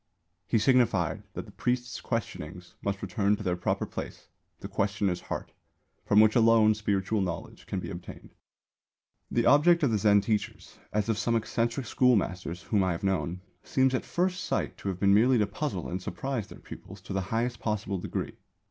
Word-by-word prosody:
He 115 Hz, -, +2 dB
signified 110 Hz, -7 st, +2 dB
that -, -, -5 dB
the -, -, -13 dB
priest's 125 Hz, +1 st, -2 dB
questionings 90 Hz, -7 st, -5 dB
must 100 Hz, 0 st, -3 dB
return 100 Hz, +2 st, +1 dB
to 105 Hz, -, -8 dB
their 90 Hz, -3 st, 0 dB
proper 90 Hz, -, -1 dB
place, -, -, -8 dB, 0.3 s
the -, -, -6 dB
questioner's 100 Hz, -3 st, 0 dB
heart, -, -, -5 dB, 0.6 s
from 105 Hz, -, +5 dB
which 110 Hz, 0 st, +6 dB
alone 115 Hz, -2 st, +6 dB
spiritual 105 Hz, 0 st, 0 dB
knowledge 90 Hz, -3 st, -5 dB
can -, -, -2 dB
be -, -, -6 dB
obtained. -, -, -9 dB, 1.0 s
The 120 Hz, -1 st, +1 dB
object 170 Hz, +3 st, +5 dB
of 135 Hz, -, +3 dB
the 110 Hz, -, +1 dB
Zen 100 Hz, 0 st, +5 dB
teachers, 105 Hz, +1 st, -3 dB
as 105 Hz, 0 st, 0 dB
of 110 Hz, -2 st, 0 dB
some 115 Hz, +3 st, +1 dB
eccentric 115 Hz, +3 st, -1 dB
schoolmasters 95 Hz, -8 st, +1 dB
whom 105 Hz, -3 st, +1 dB
I 95 Hz, -1 st, +1 dB
have 85 Hz, -, -6 dB
known, 95 Hz, -2 st, -1 dB, 0.2 s
seems 130 Hz, 0 st, +2 dB
at 130 Hz, -, 0 dB
first 185 Hz, +1 st, -1 dB
sight -, -, -1 dB
to -, -, -7 dB
have 90 Hz, -2 st, -4 dB
been 100 Hz, 0 st, +4 dB
merely 120 Hz, +5 st, +5 dB
to 105 Hz, -, +3 dB
puzzle 100 Hz, -, -3 dB
and 90 Hz, +2 st, -4 dB
surprise 130 Hz, +1 st, -3 dB
their -, -, -12 dB
pupils 95 Hz, +1 st, -11 dB
to 95 Hz, -, -7 dB
the 95 Hz, -, 0 dB
highest 120 Hz, +1 st, -1 dB
possible 105 Hz, -3 st, -2 dB
degree. -, -, -4 dB
105 Hz, 185 wpm, -28 LUFS, 95-120 Hz, 1.0 s, which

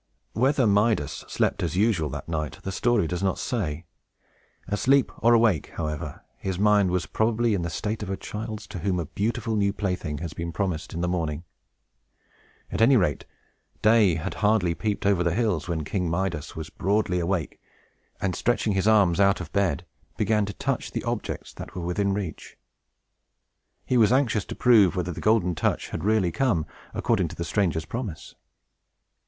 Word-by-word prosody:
Whether 130 Hz, +2 st, +2 dB
Midas 105 Hz, -, +1 dB
slept -, -, 0 dB
as 85 Hz, +1 st, -2 dB
usual 100 Hz, -7 st, +2 dB
that 70 Hz, +1 st, -6 dB
night, 75 Hz, -5 st, -3 dB
the 95 Hz, -, -3 dB
story 120 Hz, 0 st, +2 dB
does 90 Hz, +3 st, -3 dB
not 95 Hz, -1 st, 0 dB
say. 85 Hz, -, -3 dB, 0.8 s
Asleep 125 Hz, +7 st, +2 dB
or 120 Hz, +1 st, +5 dB
awake, 110 Hz, -9 st, +2 dB
however, 75 Hz, -1 st, -4 dB
his 95 Hz, -2 st, -3 dB
mind 105 Hz, -1 st, +4 dB
was 90 Hz, -3 st, 0 dB
probably 115 Hz, +6 st, +1 dB
in 95 Hz, -, 0 dB
the 85 Hz, -, -2 dB
state 105 Hz, +7 st, -3 dB
of 105 Hz, -, -5 dB
a 95 Hz, -, -2 dB
child's, 110 Hz, 0 st, -6 dB
to 90 Hz, -, -6 dB
whom 90 Hz, +1 st, 0 dB
a 85 Hz, -, -2 dB
beautiful 110 Hz, -, -2 dB
new 100 Hz, -1 st, +2 dB
plaything 90 Hz, -7 st, -3 dB
has 80 Hz, 0 st, -5 dB
been 85 Hz, 0 st, -4 dB
promised 90 Hz, -4 st, -3 dB
in 85 Hz, -, -2 dB
the 90 Hz, -, 0 dB
morning. 80 Hz, -3 st, -2 dB, 1.3 s
At -, -, -2 dB
any 125 Hz, +3 st, +6 dB
rate, 90 Hz, -8 st, 0 dB, 0.6 s
day 105 Hz, -5 st, +5 dB
had 85 Hz, +4 st, -3 dB
hardly 105 Hz, -5 st, +3 dB
peeped 105 Hz, +3 st, -2 dB
over 100 Hz, -3 st, +3 dB
the 85 Hz, -1 st, 0 dB
hills, 110 Hz, -4 st, 0 dB
when 85 Hz, -2 st, -2 dB
King 90 Hz, +2 st, -2 dB
Midas 85 Hz, -3 st, -2 dB
was 80 Hz, -2 st, -6 dB
broad 100 Hz, +1 st, 0 dB
awake, 90 Hz, -2 st, -1 dB, 0.6 s
and, 95 Hz, -2 st, -1 dB
stretching 115 Hz, -3 st, +1 dB
his 95 Hz, +2 st, +1 dB
arms 100 Hz, -5 st, +4 dB
out 100 Hz, 0 st, +4 dB
of -, -, -8 dB
bed, 95 Hz, -8 st, +1 dB, 0.3 s
began 105 Hz, -2 st, +1 dB
to 105 Hz, -, -5 dB
touch -, -, -2 dB
the -, -, -3 dB
objects -, -, -4 dB
that -, -, -9 dB
were 90 Hz, -2 st, -4 dB
within 100 Hz, +3 st, 0 dB
reach. 95 Hz, -5 st, -5 dB, 1.3 s
He 125 Hz, -, +1 dB
was 110 Hz, -1 st, +5 dB
anxious 125 Hz, -6 st, +2 dB
to -, -, -7 dB
prove 105 Hz, -7 st, +5 dB
whether 90 Hz, -1 st, -1 dB
the -, -, -7 dB
Golden 105 Hz, -5 st, +3 dB
Touch 75 Hz, -, -1 dB
had 80 Hz, -, -5 dB
really 105 Hz, -4 st, +2 dB
come, 100 Hz, -, +1 dB, 0.3 s
according -, -, +1 dB
to -, -, -9 dB
the 85 Hz, -, -4 dB
stranger's 85 Hz, -5 st, 0 dB
promise. 95 Hz, -, -6 dB
95 Hz, 180 wpm, -26 LUFS, 85-110 Hz, 1.3 s, any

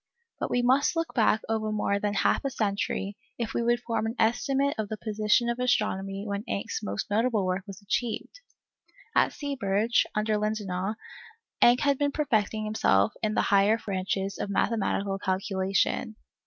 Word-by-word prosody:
But -, -, -2 dB
we 245 Hz, -, +1 dB
must 260 Hz, +7 st, +3 dB
look 330 Hz, 0 st, -2 dB
back 220 Hz, -2 st, +3 dB
over 220 Hz, -1 st, -1 dB
more 200 Hz, -1 st, 0 dB
than 205 Hz, 0 st, -1 dB
half -, -, +2 dB
a 275 Hz, -, 0 dB
century, 200 Hz, -3 st, -2 dB, 0.2 s
if 235 Hz, -2 st, -3 dB
we -, -, 0 dB
would 240 Hz, +1 st, +2 dB
form 230 Hz, -2 st, -1 dB
an 225 Hz, -, -4 dB
estimate 270 Hz, +5 st, +2 dB
of 210 Hz, -2 st, -2 dB
the 215 Hz, -, -4 dB
position 215 Hz, +2 st, +1 dB
of 235 Hz, +1 st, -1 dB
astronomy 195 Hz, -5 st, 0 dB
when 200 Hz, 0 st, -3 dB
Encke's 200 Hz, -, -2 dB
most 100 Hz, -, -4 dB
notable 220 Hz, -1 st, +2 dB
work 185 Hz, +1 st, -1 dB
was 195 Hz, +1 st, -10 dB
achieved. 235 Hz, -, -3 dB, 0.8 s
At -, -, +4 dB
Seeberge, 235 Hz, -, 0 dB
under 215 Hz, 0 st, +1 dB
Lindenau, 210 Hz, -2 st, -2 dB, 0.7 s
Encke 240 Hz, +1 st, +6 dB
had 280 Hz, -2 st, +2 dB
been 285 Hz, -1 st, +1 dB
perfecting 220 Hz, -7 st, 0 dB
himself 100 Hz, -, +2 dB
in 215 Hz, -1 st, 0 dB
the -, -, +3 dB
higher 200 Hz, +3 st, +5 dB
branches 195 Hz, -1 st, -3 dB
of -, -, -3 dB
mathematical 200 Hz, -2 st, 0 dB
calculation. 195 Hz, +3 st, 0 dB
215 Hz, 165 wpm, -27 LUFS, 200-235 Hz, 0.8 s, Encke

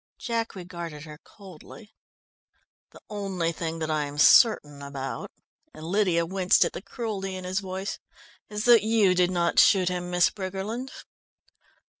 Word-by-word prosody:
Jack 230 Hz, -2 st, -3 dB
regarded 170 Hz, -5 st, -8 dB
her 155 Hz, -1 st, -11 dB
coldly. 200 Hz, +2 st, -14 dB, 1.0 s
"The -, -, -17 dB
only 195 Hz, -5 st, -3 dB
thing 165 Hz, 0 st, -5 dB
that 160 Hz, -1 st, -3 dB
I 150 Hz, -1 st, 0 dB
am 145 Hz, 0 st, -8 dB
certain 145 Hz, -, +5 dB
about," 140 Hz, -1 st, -6 dB, 0.5 s
and 155 Hz, +1 st, -9 dB
Lydia 180 Hz, -2 st, +1 dB
winced 185 Hz, +1 st, +3 dB
at -, -, -4 dB
the -, -, -6 dB
cruelty 195 Hz, -4 st, -5 dB
in 185 Hz, -, -7 dB
his 185 Hz, +1 st, -2 dB
voice, 190 Hz, 0 st, -5 dB, 0.5 s
"is 210 Hz, 0 st, -4 dB
that 240 Hz, -2 st, +7 dB
you 215 Hz, -4 st, +3 dB
did 180 Hz, -1 st, +2 dB
not 175 Hz, -2 st, +1 dB
shoot 185 Hz, -2 st, +5 dB
him, 180 Hz, -1 st, -4 dB
Miss 180 Hz, 0 st, +3 dB
Briggerland." 200 Hz, +6 st, -5 dB
185 Hz, 150 wpm, -26 LUFS, 165-205 Hz, 1.0 s, that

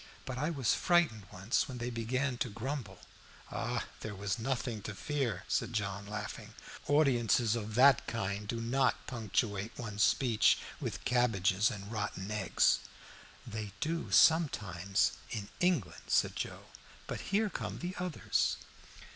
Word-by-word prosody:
But 125 Hz, -1 st, -4 dB
I 150 Hz, +3 st, 0 dB
was 135 Hz, -9 st, +1 dB
frightened 165 Hz, -, +2 dB
once, 95 Hz, +11 st, 0 dB
when 130 Hz, -3 st, -6 dB
they 120 Hz, +1 st, -3 dB
began 125 Hz, +3 st, -1 dB
to 125 Hz, -, 0 dB
grumble." 115 Hz, -3 st, -5 dB, 1.0 s
"There 105 Hz, -2 st, -6 dB
was 100 Hz, +3 st, -2 dB
nothing 120 Hz, -2 st, -2 dB
to 105 Hz, +1 st, -6 dB
fear," 130 Hz, -, -2 dB
said -, -, 0 dB
John, 100 Hz, -2 st, -2 dB
laughing. 105 Hz, 0 st, -6 dB, 0.3 s
"Audiences 120 Hz, -6 st, +3 dB
of 110 Hz, -2 st, -4 dB
that 130 Hz, +1 st, +6 dB
kind 100 Hz, -1 st, -2 dB
do 115 Hz, +2 st, -2 dB
not 130 Hz, +3 st, +1 dB
punctuate 110 Hz, -2 st, -2 dB
one's 105 Hz, -3 st, -4 dB
speeches 120 Hz, -3 st, +4 dB, 0.2 s
with -, -, -5 dB
cabbages 110 Hz, -5 st, +3 dB
and 105 Hz, -3 st, -7 dB
rotten 105 Hz, -2 st, -3 dB
eggs." 105 Hz, -4 st, +3 dB, 0.7 s
"They 105 Hz, -2 st, -5 dB
do 165 Hz, +5 st, -2 dB
sometimes 100 Hz, -, +3 dB, 0.2 s
in 105 Hz, -3 st, -5 dB
England," 165 Hz, -, 0 dB
said -, -, +2 dB
Joe. -, -, -4 dB, 0.4 s
"But -, -, -4 dB
here 210 Hz, +1 st, +2 dB
come -, -, -4 dB
the 180 Hz, +1 st, -5 dB
others!" 180 Hz, -3 st, 0 dB
115 Hz, 140 wpm, -33 LUFS, 100-135 Hz, 1.0 s, that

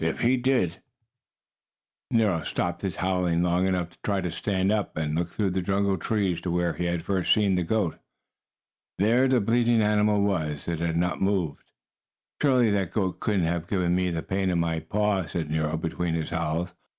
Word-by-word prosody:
If 80 Hz, -, -1 dB
he 125 Hz, +2 st, +4 dB
did 125 Hz, -9 st, 0 dB, 0.6 s
" -, -, -68 dB
Nero 105 Hz, -8 st, +2 dB
stopped 85 Hz, +2 st, -2 dB
his 95 Hz, -2 st, -3 dB
howling 90 Hz, -2 st, 0 dB
long 90 Hz, +1 st, +2 dB
enough 90 Hz, -2 st, -1 dB
to -, -, -23 dB
try 100 Hz, -2 st, 0 dB
to 90 Hz, -2 st, -3 dB
stand 95 Hz, 0 st, 0 dB
up 105 Hz, -6 st, -1 dB
and 75 Hz, -1 st, -1 dB
look 85 Hz, +2 st, -1 dB
through 100 Hz, -1 st, -1 dB
the 95 Hz, +1 st, -1 dB
jungle 100 Hz, +2 st, +1 dB
trees 95 Hz, -3 st, 0 dB
to 90 Hz, -, -3 dB
where 85 Hz, -1 st, 0 dB
he 90 Hz, -, -3 dB
had 85 Hz, -1 st, -1 dB
first 95 Hz, 0 st, 0 dB
seen 105 Hz, -3 st, +4 dB
the 90 Hz, -, +1 dB
goat. 90 Hz, -1 st, -1 dB, 1.0 s
There 120 Hz, +6 st, +3 dB
the 130 Hz, -1 st, +3 dB
bleating 115 Hz, +2 st, +2 dB
animal 105 Hz, -1 st, +3 dB
was. 80 Hz, -7 st, -1 dB
It 85 Hz, -2 st, -2 dB
had 85 Hz, -1 st, -1 dB
not 90 Hz, +1 st, -1 dB
moved. 95 Hz, -7 st, -1 dB, 0.8 s
"Surely 125 Hz, -6 st, +4 dB
that 100 Hz, -4 st, 0 dB
goat 95 Hz, -4 st, -1 dB
couldn't 100 Hz, -6 st, +1 dB
have 85 Hz, 0 st, -2 dB
given 90 Hz, -3 st, +1 dB
me 90 Hz, 0 st, +1 dB
the 85 Hz, -2 st, -3 dB
pain 95 Hz, 0 st, -1 dB
in 90 Hz, -, +1 dB
my 85 Hz, -1 st, 0 dB
paw," 100 Hz, +1 st, 0 dB
said 80 Hz, -3 st, -4 dB
Nero, 80 Hz, 0 st, 0 dB
between 85 Hz, +1 st, -2 dB
his 80 Hz, 0 st, -3 dB
howls. 85 Hz, +1 st, -2 dB
90 Hz, 195 wpm, -26 LUFS, 85-100 Hz, 1.0 s, he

